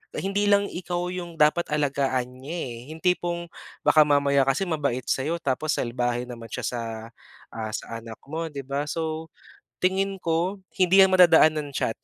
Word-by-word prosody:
Hindi 200 +1 0
lang 200 0 +4
ikaw 175 -1 -4
'yong 175 -2 -6
dapat 150 +3 +3
alagaan 135 -4 -1
niya 155 +6 -5
eh, 125 -8 -5 0.2
yung 160 - -13
tipong 175 -1 0 0.4
baka 155 - +6
mamaya 140 -1 +3
kasi 135 +8 +1
mabait 140 -7 -1
sa'yo 155 +6 0
tapos 155 -1 -1
salbahe 120 0 -1
naman 120 -2 -9
siya 125 +1 -4
sa 120 +1 -2 0.7
ah 110 -1 -4
sa 115 +1 -6
anak 115 -1 -10
mo 160 +3 -4
'di 140 -3 -7
ba. 140 +2 -2
So 160 +1 -3 0.5
tingin 195 +1 0
ko, 175 +4 -1 0.2
hindi 185 +1 +6
yan 190 - +7
madadaan 170 -4 +6
ng 150 -1 -3
chat. 115 - -1
155 Hz, 170 wpm, -25 LUFS, 130-175 Hz, 0.7 s, yan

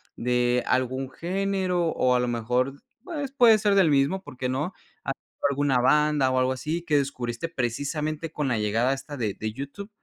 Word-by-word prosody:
de 125 0 +1
algún 130 +1 0
género 185 +1 -1
o 125 -5 +2
a 125 - +3
lo 125 - 0
mejor, 125 +3 0 0.3
pues 295 -7 -4
puede 240 -5 +6
ser 205 -1 +2
del 190 -5 +5
mismo, 145 +6 +2
¿por 130 - -12
qué 130 - -2
no? 150 +8 -2 0.3
Has - - -2
visto - - -4
alguna 140 -2 +2
banda 150 +1 +3
o 130 - 0
algo 130 0 +2
así 155 +6 -3
que 150 -4 +2
descubriste 135 +1 -2
precisamente 150 +4 -2
con 150 -3 -2
la 120 -4 0
llegada 115 +5 +1
esta 145 +1 -7
de 110 -5 -1
de 110 +2 -4
YouTube. 140 - -7
140 Hz, 190 wpm, -26 LUFS, 125-165 Hz, 0.3 s, puede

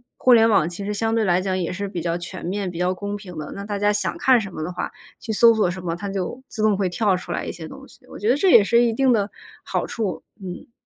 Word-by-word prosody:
互 255 - +3
联 225 -1 +6
网 170 -6 +3
其 185 +3 -6
实 210 - -2
相 225 +2 0
对 225 -1 +2
来 180 -1 +2
讲 185 -1 -1
也 180 0 -2
是 200 +1 -4
比 175 -3 -4
较 170 +1 -1
全 175 +1 -7
面、 190 +1 -2
比 175 - -7
较 180 +1 +1
公 205 +2 -4
平 180 -5 -10
的。 155 - -6
那 200 - -7
大 205 -1 -3
家 205 +1 +2
想 205 -2 -1
看 260 -2 +4
什 195 -4 -6
么 155 - -5
的 170 - -4
话， 180 0 -4 0.3
去 220 - -4
搜 230 +2 +6
索 215 -5 +2
什 185 +1 -6
么， 165 -2 -2
它 200 - -5
就 195 +6 -4
自 215 - -4
动 215 -2 +3
会 195 -2 +1
跳 190 0 +1
出 175 -1 -6
来 - - -3
一 - - -3
些 160 -2 -8
东 - - -11
西， - - -20
我 - - -10
觉 210 +3 -1
得 265 - +4
这 380 +4 +3
也 220 - +8
是 235 +4 +4
一 235 -2 +2
定 265 +1 +3
的 205 -3 +2 0.4
好 - - -1
处， 195 -8 -3 0.2
嗯。 180 +4 -8
200 Hz, 320 characters per minute, -22 LUFS, 180-220 Hz, 0.4 s, 也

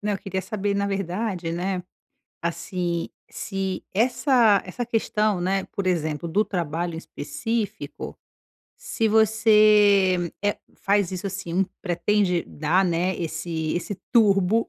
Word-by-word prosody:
Não, 210 0 -1
eu 195 - -2
queria 190 -1 -3
saber 205 -1 -2
na 200 0 0
verdade 195 -2 -2
né, 180 +2 -2 0.6
assim, 170 0 -2 0.2
se 195 -1 -3
essa 240 -2 +4
essa 240 +7 -4
questão, 215 -4 0
né, 190 +2 0
por 200 - -4
exemplo, 165 -2 -1
do 205 +6 +2
trabalho 170 -2 -2
em - - -5
específico, 195 +9 -4 0.6
se 225 - -1
você, 210 -4 +4
eh, 205 0 0 0.2
faz 200 -2 +1
isso 185 +1 -3
assim, 190 -3 -5
um 190 - +3 0.2
pretende 180 0 +1
dar, 160 +6 +1
né, 180 +1 0
esse 160 -1 -3
esse 180 +4 -3 0.2
turbo 210 -2 +4
195 Hz, 130 wpm, -24 LUFS, 175-210 Hz, 0.6 s, essa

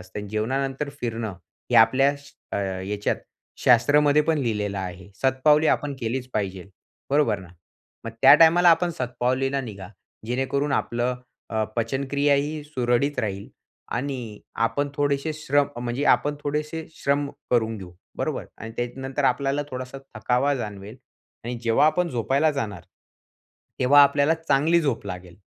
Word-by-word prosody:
असतं. 95 +3 -8
जेवणानंतर 135 +7 -2
फिरणं 115 -4 -3 0.4
हे 120 - +3
आपल्या 130 +5 +5
श 140 0 -17 0.2
अ, - - 0
ह्याच्यात 100 +1 -2 0.4
शास्त्रामध्ये 145 +4 +4
पण 160 0 +1
लिहिलेलं 105 -6 -2
आहे. 95 0 -7
शतपावली 150 +4 +4
आपण 145 -2 +1
केलीच 125 +2 -3
पाहिजे, 95 -3 -3 0.5
बरोबर 140 -8 +2
ना, 95 -3 -12 0.6
मग 115 - -4
त्या - - +10
टाईमाला 175 +2 +6
आपण 170 +1 +3
शतपावलीला 130 +2 -1
निघा, 100 -7 -8 0.4
जेणेकरून 135 +4 -1
आपलं 120 0 -1 0.3
अ, 110 -1 0
पचनक्रियाही 140 +5 0
सुरळीत 140 -1 0
राहील 100 -2 -4 0.5
आणि 125 -5 -5 0.3
आपण 145 +4 -2
थोडेसे 145 +1 0
श्रम, 145 -2 +1
म्हणजे 125 +4 -2
आपण 145 +4 -2
थोडेसे 150 +2 -3
श्रम 140 +1 0 0.2
करून 115 -2 +1
घेऊ, 95 -2 -9 0.3
बरोबर - - -2
आणि 115 0 -8
त्याच्यानंतर 130 +3 -3
आपल्याला 140 +1 +1
थोडासा 130 +1 -6 0.2
थकावा 125 +6 +1
जाणवेल 105 -2 -6 0.5
आणि 120 +1 -3
जेव्हा 115 +6 +4
आपण 180 +3 +2
झोपायला 135 +4 +1
जाणार, 105 - -4 1.0
तेव्हा 145 +3 +6
आपल्याला 145 +2 +3
चांगली 165 +1 +2
झोप 135 -9 -2
लागेल. 90 -2 -8
130 Hz, 135 wpm, -24 LUFS, 110-145 Hz, 1.0 s, त्या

